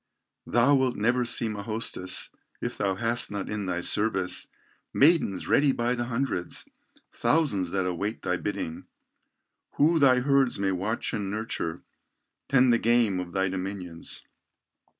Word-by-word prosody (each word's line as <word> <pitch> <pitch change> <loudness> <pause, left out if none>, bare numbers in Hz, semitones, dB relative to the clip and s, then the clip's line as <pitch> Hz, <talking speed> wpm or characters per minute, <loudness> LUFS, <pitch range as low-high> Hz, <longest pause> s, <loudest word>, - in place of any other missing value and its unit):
Thou 120 +5 +4
wilt 130 -2 +2
never 125 +4 +1
seem 115 -2 -1
a 100 - -5
hostess, 110 -4 0 0.3
If - - -4
thou 95 -1 -1
hast 115 +4 0
not 100 -1 -4
in 105 -2 -3
thy 90 -1 -2
service, 95 -2 +1 0.5
Maidens 145 - +3
ready 145 -1 +4
by 120 -1 0
the 120 -1 -2
hundreds, 120 -7 -3 0.5
Thousands 130 - +1
that 95 +1 -1
await 100 +5 -3
thy 90 - 0
bidding, 85 -4 -5 0.9
Who 160 +3 +3
thy 130 -3 +5
herds 135 -2 +2
may 100 -1 0
watch 100 +5 -2
and 105 -4 -2
nurture, 105 -6 -4 0.6
Tend 130 -2 +4
the 115 - +3
game 115 -5 +2
of 90 -1 -5
thy 95 +1 0
dominions. 90 -3 -5
110 Hz, 145 wpm, -27 LUFS, 95-125 Hz, 0.9 s, thy